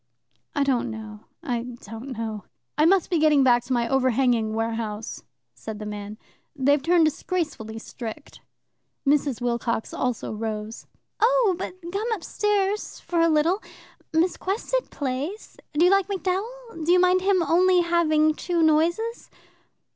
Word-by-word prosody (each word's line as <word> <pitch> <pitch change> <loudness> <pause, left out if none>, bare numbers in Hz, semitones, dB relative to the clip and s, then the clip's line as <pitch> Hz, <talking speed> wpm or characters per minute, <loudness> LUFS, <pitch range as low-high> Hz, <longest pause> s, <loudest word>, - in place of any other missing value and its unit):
"I 285 - +2
don't 250 -3 +1
know, 215 -1 -8 0.2
I 245 -7 -1 0.2
don't 225 +5 -9
know." 220 -3 -4 0.3
"I 305 - +3
must 380 +1 +3
be 340 - +2
getting 300 -3 +5
back 240 -2 +4
to 255 - -2
my 235 -1 +1
overhanging 245 -4 +2
warehouse," 225 -1 -3 0.3
said 220 -1 -7
the 210 - -7
man. 210 0 -6 0.4
"They've 285 +1 +3
turned 335 +2 +4
disgracefully 310 - -2
strict. 230 +5 -8 0.6
Mrs. 280 -3 +2
Wilcox 235 -2 -1
also 250 -3 -2
rose. 215 0 -5 0.3
"Oh, 465 -4 +4
but 360 0 -5 0.2
come 435 +4 -1
upstairs 415 0 -1
for 345 - -2
a 335 - +4
little. 325 +6 +2 0.5
Miss 335 +3 +2
Quested 465 +6 -2
plays. 285 +9 -4 0.2
Do 310 +4 +4
you 360 - +5
like 390 -1 +3
MacDowell? 400 +1 -3
Do 335 - +2
you 360 - +6
mind 365 +1 +4
him 380 -2 +3
only 360 +2 +4
having 310 -3 +3
two 340 +1 -1
noises? 340 +9 +1
305 Hz, 145 wpm, -25 LUFS, 235-365 Hz, 0.6 s, you